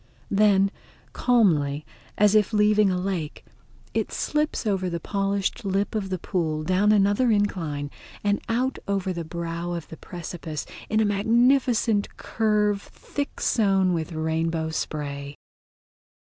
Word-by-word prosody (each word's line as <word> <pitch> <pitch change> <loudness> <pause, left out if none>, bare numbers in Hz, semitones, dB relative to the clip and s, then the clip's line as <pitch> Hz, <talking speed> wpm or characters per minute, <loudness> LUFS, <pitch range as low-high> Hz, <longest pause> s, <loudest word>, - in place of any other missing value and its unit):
Then 200 -1 +4 0.4
calmly, 155 - +2 0.3
as 210 0 +5
if 215 0 +3
leaving 210 -1 +4
a 185 - 0
lake, 180 -5 -3 0.5
it - - -1
slips 300 -4 -1
over 190 -3 0
the 170 -1 -3
polished 200 +4 -1
lip 195 0 0
of 205 -3 -2
the 185 - -1
pool 160 -4 -2
down 185 +5 +3
another 205 +4 +3
incline 165 -9 0 0.3
and 205 0 +1
out 255 +3 0
over 195 -2 -1
the 170 -1 -4
brow 170 +1 -4
of 170 -2 -6
the 160 - -9
precipice 165 -3 -6 0.2
in 220 +1 +2
a - - +3
magnificent 230 +1 +2
curve 210 -2 +1
thick 285 +6 -6
sown 195 -4 +2
with 165 0 -2
rainbow 160 0 -1
spray. 140 -2 -4
195 Hz, 130 wpm, -25 LUFS, 165-210 Hz, 0.5 s, as